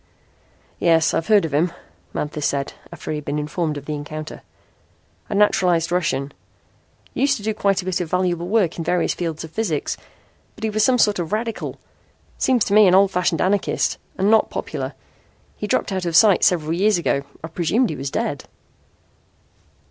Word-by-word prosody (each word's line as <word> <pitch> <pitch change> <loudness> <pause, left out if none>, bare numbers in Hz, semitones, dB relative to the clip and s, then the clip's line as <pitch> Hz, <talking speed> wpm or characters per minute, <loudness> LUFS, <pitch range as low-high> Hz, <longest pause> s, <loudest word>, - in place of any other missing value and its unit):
"Yes, 165 -2 +3
I've 165 - -1
heard 210 -5 +5
of 155 - -5
him," 165 +4 +2 0.4
Manthis 150 0 -2
said 140 -1 -2 0.2
after - - -7
he 155 - -2
had 150 - -8
been 145 +1 -2
informed 150 +1 -2
of 145 - -8
the 150 - -3
encounter. 155 +1 -7 0.9
"A 210 - -2
naturalized 180 -5 +3
Russian. 145 -6 0 0.8
Used 275 +1 +2
to 205 - -10
do 220 +1 0
quite 200 -3 +1
a - - -12
bit 185 -1 -1
of 170 - -4
valuable 180 -1 0
work 190 -5 +1
in - - -2
various 175 +2 +1
fields 165 -3 -4
of 160 - -9
physics. 170 -8 -2 0.6
But - - -12
he 220 - 0
was 215 0 +1
some 255 -1 +4
sort 210 -4 +3
of 165 -2 -3
radical 225 +1 -3 0.6
seems 250 -4 +2
to 200 - -1
me 210 -1 +7
an 180 - +5
old 195 0 +5
fashioned 175 -3 0
anarchist 200 +1 0 0.2
and 195 +3 +2
not 220 - +4
popular. - - -5 0.6
He 210 - -5
dropped - - 0
out 185 -2 -2
of 165 - -2
sight 200 +1 +6
several 160 -3 +2
years 200 +3 +3
ago. 155 -4 0 0.2
I - - -4
presumed 180 +7 +1
he - - -4
was 135 0 -4
dead." - - -3
180 Hz, 185 wpm, -21 LUFS, 155-205 Hz, 0.9 s, me